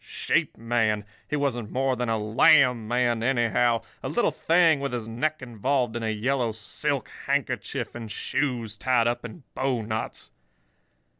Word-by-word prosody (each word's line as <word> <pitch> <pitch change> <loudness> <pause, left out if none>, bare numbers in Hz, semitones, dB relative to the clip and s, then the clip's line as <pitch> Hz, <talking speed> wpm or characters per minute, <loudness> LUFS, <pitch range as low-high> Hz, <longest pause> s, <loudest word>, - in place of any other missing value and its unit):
Sheep - - -1
man?—he 110 +1 -1
wasn't 125 -7 -1
more 130 +2 0
than 125 -1 -2
a 110 - +1
lamb 115 +2 +4
man, 120 -1 +1
anyhow—a 115 -2 0
little 240 - +1
thing 165 -3 +3
with 140 -2 -3
his 115 -3 -3
neck 150 +6 -2
involved 125 +1 -1
in 120 - -2
a 110 - -1
yellow 120 +2 0
silk 110 - -2 0.2
handkerchief, - - -2
and 115 -2 -7
shoes 125 -1 -2
tied 125 -3 +2
up 120 +1 0
in 120 +6 -9
bowknots. 110 - -3
120 Hz, 140 wpm, -26 LUFS, 110-135 Hz, 0.2 s, lamb